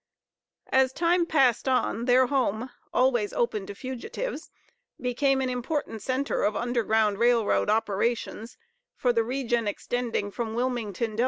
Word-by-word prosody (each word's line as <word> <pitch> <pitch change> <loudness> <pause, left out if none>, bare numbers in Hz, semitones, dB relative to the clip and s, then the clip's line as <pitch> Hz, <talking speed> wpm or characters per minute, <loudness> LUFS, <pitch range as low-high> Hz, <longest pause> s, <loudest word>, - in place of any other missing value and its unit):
As 265 -1 +4
time 340 +3 +2
passed 265 -6 +3
on, 240 -2 0
their 255 +1 +5
home, 250 -2 -1 0.2
always 245 -5 +2
open 215 -5 -1
to 200 - -7
fugitives, 260 - -5 0.5
became 265 +2 +1
an 260 - 0
important 250 -2 -3
centre 260 +5 -1
of 210 - +1
Underground 220 -4 +1
Rail 235 -1 +4
Road - - +1
operations 220 +1 -1 0.4
for 245 -1 +1
the 230 -1 +2
region 240 -2 -1
extending 225 0 -2
from 220 +3 -4
Wilmington, 230 -3 -2
Del. - - -6
240 Hz, 140 wpm, -27 LUFS, 220-260 Hz, 0.5 s, their